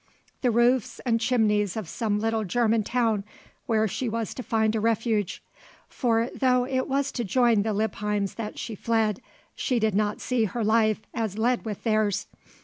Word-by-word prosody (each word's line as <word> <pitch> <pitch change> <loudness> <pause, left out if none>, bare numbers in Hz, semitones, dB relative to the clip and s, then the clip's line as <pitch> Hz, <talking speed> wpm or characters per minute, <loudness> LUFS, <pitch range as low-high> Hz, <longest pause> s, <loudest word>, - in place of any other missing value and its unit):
the 250 - +2
roofs 240 +1 +2
and 230 -2 +2
chimneys 215 -4 +2
of 215 -6 -4
some 210 +3 -1
little 225 0 0
German 225 +2 +1
town 225 -3 0 0.4
where 220 -2 +2
she 235 +5 -2
was 225 -1 -3
to - - -6
find 220 -2 +1
a - - +1
refuge; 220 -2 0 0.4
for 230 -2 +1
though 250 -2 +2
it 260 0 -1
was 275 0 0
to 240 - -3
join 235 0 +3
the 220 +2 -1
Lippheims 210 -1 -1
that 220 -2 -6
she 230 - -5
fled, 220 -1 0 0.3
she 255 - -1
did 220 -2 +1
not 210 +1 0
see 245 -3 0
her 225 +3 -3
life 220 0 +2
as 220 -4 -2
led 240 +2 +1
with 210 -3 -5
theirs. 215 -3 +1
225 Hz, 175 wpm, -26 LUFS, 210-240 Hz, 0.4 s, join